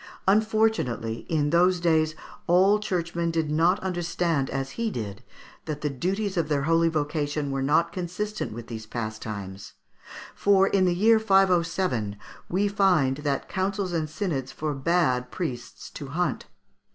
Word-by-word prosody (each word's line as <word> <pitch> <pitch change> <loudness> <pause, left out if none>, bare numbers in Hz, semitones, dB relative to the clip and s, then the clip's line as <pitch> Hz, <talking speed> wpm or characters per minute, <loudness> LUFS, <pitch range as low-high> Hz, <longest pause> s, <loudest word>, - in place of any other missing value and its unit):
Unfortunately, 215 - +1
in 150 -3 +1
those 180 +2 +4
days, 160 -2 +2 0.3
all 190 +4 +5
church 175 -5 -2
men 170 0 0
did 160 -2 -1
not 170 +6 +3
understand, 175 -5 -1
as 135 0 -3
he 230 -1 -2
did, 105 - -5 0.4
that 150 -2 -4
the 150 - -1
duties 190 +8 -2
of 160 -3 0
their 145 -2 +1
holy 165 +2 +3
vocation 150 -2 -2
were 135 0 -1
not 165 +5 +2
consistent 185 +4 -4
with 115 +1 -7
these 110 -1 -8
pastimes, 110 -4 -6 0.6
for, 195 -1 +4
in 195 -2 +2
the 175 -1 +2
year 220 +4 +5
507, 180 - +2 0.3
we 195 +4 +1
find 180 -10 +2
that 145 -2 -2
councils 190 -1 -2
and 160 -2 -1
synods 155 -6 -3
forbade 145 -3 0
priests 125 -9 -6
to 145 - -7
hunt. 175 +6 -2
165 Hz, 145 wpm, -26 LUFS, 135-185 Hz, 0.6 s, all